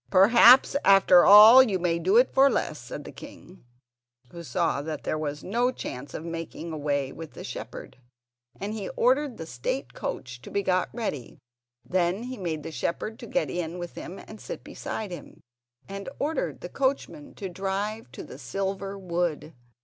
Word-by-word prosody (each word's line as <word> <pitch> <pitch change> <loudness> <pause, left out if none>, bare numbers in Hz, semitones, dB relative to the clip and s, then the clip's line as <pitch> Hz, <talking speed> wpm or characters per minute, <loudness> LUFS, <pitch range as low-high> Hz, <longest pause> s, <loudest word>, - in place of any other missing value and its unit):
"Perhaps 235 +8 +7
after 195 -2 +6
all 215 +5 +10
you 215 -7 +1
may 170 -2 0
do 190 +6 +3
it 250 +2 +4
for 275 +1 +6
less," - - -2
said - - -8
the - - -9
king, 180 +1 -13 0.7
who 170 - -9
saw 165 -3 -1
that 155 +1 -6
there - - -1
was 150 -1 -4
no 240 +5 0
chance 140 - -7
of 160 - -6
making 165 0 -6
away 145 -3 -2
with 160 +1 -10
the - - -9
shepherd; - - -8 0.6
and 205 +2 -4
he 210 -3 -5
ordered 260 +1 +2
the 160 - -7
state 130 -1 -4
coach 125 -1 -6
to - - -11
be 200 - -1
got 185 -1 +1
ready, 180 - -5 0.5
then 180 +3 0
he 255 +1 -6
made 160 -5 -4
the - - -6
shepherd 215 +7 -3
get 270 +1 -1
in 175 0 -4
with 175 -1 -7
him 185 - -8
and 215 - -12
sit - - -7
beside 210 -4 -6
him, 175 - -10 0.5
and 195 +2 -7
ordered 310 +3 -2
the - - -7
coachman 280 +2 -2
to 200 - -6
drive 195 - -4
to - - -9
the 130 - -11
silver 195 +7 -4
wood. 170 -4 -3
185 Hz, 175 wpm, -26 LUFS, 160-215 Hz, 0.7 s, all